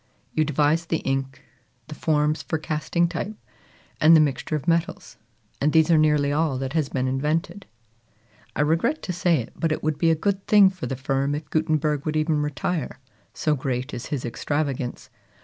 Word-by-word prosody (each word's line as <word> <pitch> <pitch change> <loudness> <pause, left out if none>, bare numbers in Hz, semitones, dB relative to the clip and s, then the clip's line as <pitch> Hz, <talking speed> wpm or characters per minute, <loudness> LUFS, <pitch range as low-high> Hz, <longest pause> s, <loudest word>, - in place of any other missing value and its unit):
You 155 - +2
devised 155 +3 +1
the 165 - +2
ink, 135 0 -2 0.4
the 155 - -7
forms 150 0 +1
for 160 - -2
casting 155 +2 0
type, 180 +5 -4 0.6
and 160 +2 +7
the - - +7
mixture 150 +1 0
of 150 +2 -4
metals; 170 0 -1 0.4
and 150 +1 +2
these 160 +1 +4
are 165 - +6
nearly 150 -2 +3
all 150 -2 +1
that 135 +1 -4
has 155 -4 0
been 130 -1 -1
invented. 160 +8 -2 0.9
I - - +1
regret 165 - +1
to 180 - -3
say 175 -1 +2
it, 120 -6 -4
but 165 -2 -1
it - - -2
would 155 -1 -1
be 165 - +3
a 165 - +4
good 195 +4 -2
thing 205 -3 +6
for 185 -1 -6
the 135 - -3
firm 135 +2 -1
if 150 - -7
Gutenberg 155 -2 0
would 155 - -1
even 155 -1 +1
retire, 150 +1 -3 0.4
so 155 - +1
great 130 -1 -3
is 120 0 -5
his 140 -4 -3
extravagance. 130 0 -3
155 Hz, 185 wpm, -24 LUFS, 140-165 Hz, 0.9 s, and